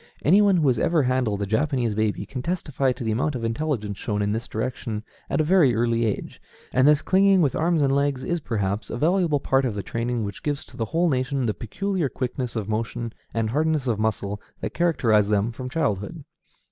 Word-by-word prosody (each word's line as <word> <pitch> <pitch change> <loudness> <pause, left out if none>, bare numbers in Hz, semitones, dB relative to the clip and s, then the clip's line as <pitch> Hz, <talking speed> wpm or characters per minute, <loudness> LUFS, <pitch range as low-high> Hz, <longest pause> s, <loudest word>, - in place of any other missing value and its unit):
Any 190 +8 +6
one 200 -3 +4
who 160 - +2
has 125 -4 +2
ever 165 -3 +2
handled 125 -6 0
a - - -1
Japanese 125 +1 0
baby 110 0 -1
can 130 - -6
testify 145 -5 -1
to 125 0 -5
the 110 - 0
amount 130 +6 0
of 120 - -4
intelligence 115 -4 -2
shown 105 -1 -1
in 100 - 0
this 115 +3 -3
direction 110 -1 -4 0.3
at - - 0
a - - +4
very 155 - +4
early 115 0 +1
age; 105 - -4 0.3
and 130 +2 +4
this 150 0 +4
clinging 195 0 +4
with 145 -6 +2
arms 165 -1 +2
and 135 -1 +2
legs 140 -2 +1
is, 175 0 -1
perhaps, 105 -6 -2
a - - -4
valuable 165 0 +2
part 135 0 +2
of 120 -5 -1
the 100 - -3
training 115 0 -2
which 100 -1 -6
gives 145 0 -2
to - - -16
the 115 - -2
whole 165 +10 +1
nation 130 -2 0
the 110 - 0
peculiar 180 - -2
quickness 125 -1 -4
of 110 -3 -2
motion 115 +1 -3 0.2
and 115 -1 -1
hardness 155 0 +1
of 115 -4 0
muscle 105 -2 -1 0.2
that - - -4
characterize 115 -12 +2
them 105 +2 +1
from 125 +2 -6
childhood. 105 -9 -2
125 Hz, 215 wpm, -24 LUFS, 110-150 Hz, 0.3 s, Any